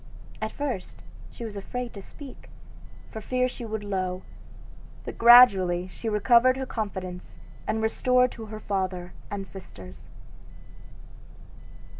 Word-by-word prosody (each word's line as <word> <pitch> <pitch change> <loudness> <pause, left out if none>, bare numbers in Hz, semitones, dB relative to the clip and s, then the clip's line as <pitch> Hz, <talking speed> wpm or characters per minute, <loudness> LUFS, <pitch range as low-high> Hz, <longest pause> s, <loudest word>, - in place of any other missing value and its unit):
At 220 0 -2
first 275 -10 -5 0.3
she 235 - -8
was 215 -2 -7
afraid 245 +4 -5
to 200 - -8
speak, 275 +6 -12 0.6
for 220 - -6
fear 255 +3 0
she 250 -1 -8
should 220 -1 -4
low, 185 -2 -2 0.8
but - - -7
gradually 195 -7 +7
she 225 +5 -5
recovered 235 +4 +4
her 265 - -3
confidence 190 -6 -5 0.3
and - - 0
was 220 0 +1
restored 250 0 +3
to 225 -2 -9
her 215 0 -7
father 185 -3 -3 0.2
and 195 -1 -5
sisters. 95 - -12
215 Hz, 130 wpm, -26 LUFS, 190-245 Hz, 0.8 s, gradually